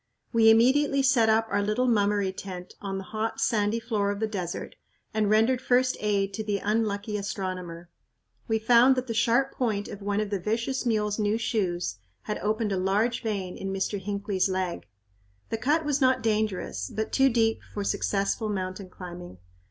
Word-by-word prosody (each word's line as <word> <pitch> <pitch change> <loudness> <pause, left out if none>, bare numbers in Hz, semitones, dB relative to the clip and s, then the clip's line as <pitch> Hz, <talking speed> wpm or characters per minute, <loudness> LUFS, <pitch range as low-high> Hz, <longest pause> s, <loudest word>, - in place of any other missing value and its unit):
We 225 -1 +6
immediately 270 +5 +4
set 240 -4 +4
up 220 +1 +3
our 200 0 +2
little 215 +5 0
"Mummery" 205 -4 +2
tent 185 -2 -8
on 195 -1 -3
the 195 - -5
hot, 220 +3 -3
sandy 215 0 +1
floor 220 -3 -1
of 200 0 -2
the 220 - +1
desert 185 -5 -5 0.4
and 215 -1 +1
rendered 225 +4 +3
first 255 0 +2
aid 200 -2 0
to 220 - -3
the 205 -1 -1
unlucky 210 0 -1
astronomer. 185 -4 -5 0.6
We 225 -2 +2
found 240 +4 +5
that 255 0 -2
the 235 - -3
sharp 240 +4 +2
point 215 -5 -1
of 205 - -8
one 205 +1 -1
of 210 -1 -2
the 200 - 0
vicious 235 +7 -1
mule's 210 -2 0
new 210 +1 +1
shoes 180 - -1 0.2
had 210 - -3
opened 215 0 -1
a 195 - 0
large 205 +6 +1
vein 200 -5 -3
in 195 - -4
Mr. 195 +1 -2
Hinckley's 200 -1 -1
leg. 185 -2 -2 0.6
The 225 - 0
cut 300 +7 +1
was 290 -1 0
not 260 -2 +3
dangerous, 210 - -1
but 220 0 -3
too 270 0 +4
deep 225 -2 +1
for 205 - -3
successful 200 +2 0
mountain 185 -1 -4
climbing. 175 - -9
210 Hz, 180 wpm, -27 LUFS, 195-230 Hz, 0.6 s, We